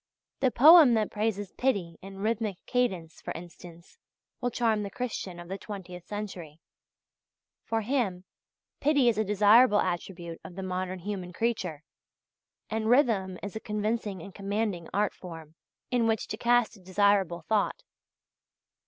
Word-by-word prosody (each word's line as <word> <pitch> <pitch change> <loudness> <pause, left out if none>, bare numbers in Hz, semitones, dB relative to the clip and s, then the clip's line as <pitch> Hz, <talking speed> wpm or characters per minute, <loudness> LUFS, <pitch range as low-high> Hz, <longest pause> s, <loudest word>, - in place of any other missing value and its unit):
The 260 - +3
poem 295 0 +8
that 215 -2 0
praises 205 -2 -2
Pity 195 -11 -1
in 195 0 -10
rhythmic 215 -2 -1
cadence, 190 -11 -1
for - - -5
instance, 170 - -12 0.4
will 245 - 0
charm 225 -3 +1
the 200 - -4
Christian 195 -6 -5
of 175 - -9
the 195 +2 -5
twentieth 185 -3 -8
century; 185 -7 -6 1.1
for 225 0 0
him, 215 -7 -1 0.6
Pity 285 -4 +4
is 220 -2 0
a - - +3
desirable 210 +2 +5
attribute 175 -1 -3
of 175 - -10
the 190 - -5
modern 185 0 -3
human 185 -1 -5
creature, 190 -8 -2 0.8
and 220 0 -2
rhythm 220 -8 +3
is 205 0 -6
a - - -3
convincing 210 -3 -2
and 195 - -10
commanding 200 -3 -2
art 205 +1 +1
form 165 -4 -10 0.4
in 240 -2 +2
which 225 -1 0
to - - -2
cast 240 0 +2
a - - -16
desirable 190 -2 +2
thought. 220 - 0
205 Hz, 145 wpm, -28 LUFS, 180-225 Hz, 1.1 s, poem